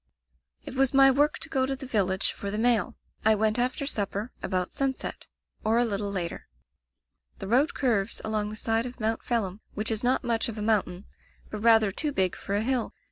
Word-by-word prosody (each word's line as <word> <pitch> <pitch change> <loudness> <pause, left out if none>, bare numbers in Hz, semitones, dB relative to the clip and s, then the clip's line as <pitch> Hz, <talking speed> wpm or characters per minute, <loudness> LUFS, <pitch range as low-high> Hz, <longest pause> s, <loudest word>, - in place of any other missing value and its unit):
"It - - -8
was 270 0 +2
my 270 0 +7
work 290 +3 +2
to - - -4
go 260 -1 0
to 270 - -1
the 265 0 -9
village 195 -6 +1
for 200 - -6
the 210 - -3
mail. 230 -1 +2 0.3
I 220 0 +5
went 215 +2 +1
after 255 +3 -1
supper, 210 -2 -1
about 185 -1 -2
sunset, 270 -1 -3 0.4
or 220 +2 +2
a 240 - +3
little 205 -2 -2
later. 175 -4 -4 0.9
"The - - -7
road 265 - +2
curves 225 -8 +1
along 215 -1 -1
the 215 - -7
side 225 +2 0
of 250 +1 -10
Mount 220 0 -1
Phelim, 215 -4 -2
which 215 +2 -1
is 220 +1 -1
not 250 +2 +2
much 235 -1 0
of 225 - -7
a - - -4
mountain, 200 -4 0 0.5
but 215 - -4
rather 220 -2 +5
too 295 +9 -1
big 190 -8 0
for 200 - -4
a 205 - +1
hill. 250 0 -1
225 Hz, 205 wpm, -27 LUFS, 205-250 Hz, 0.9 s, my